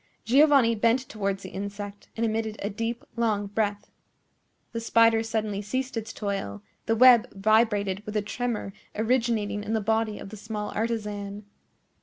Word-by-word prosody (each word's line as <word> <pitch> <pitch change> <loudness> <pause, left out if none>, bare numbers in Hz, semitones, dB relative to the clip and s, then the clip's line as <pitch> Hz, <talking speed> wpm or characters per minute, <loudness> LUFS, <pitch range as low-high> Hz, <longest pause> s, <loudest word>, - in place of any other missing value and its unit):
Giovanni 270 -1 +5
bent 235 +4 +2
towards 200 -2 -2
the 190 - -7
insect, 200 +1 -6
and 230 - +1
emitted 220 -1 -1
a 205 - -2
deep, 230 +3 -3
long 220 -3 +1
breath. 205 0 -2 0.8
The 230 - -3
spider 230 0 +4
suddenly 220 -3 -2
ceased 255 +5 -3
its 225 0 -4
toil; 195 - -4 0.2
the 225 - +3
web 245 0 +7
vibrated 205 -2 +2
with 210 0 -3
a 210 - 0
tremor 225 -2 -3 0.2
originating 220 -3 0
in 215 - -3
the 220 - +2
body 220 0 0
of - - -8
the 215 - -9
small 210 0 -5
artisan. 210 -2 -3
220 Hz, 155 wpm, -27 LUFS, 205-230 Hz, 0.8 s, web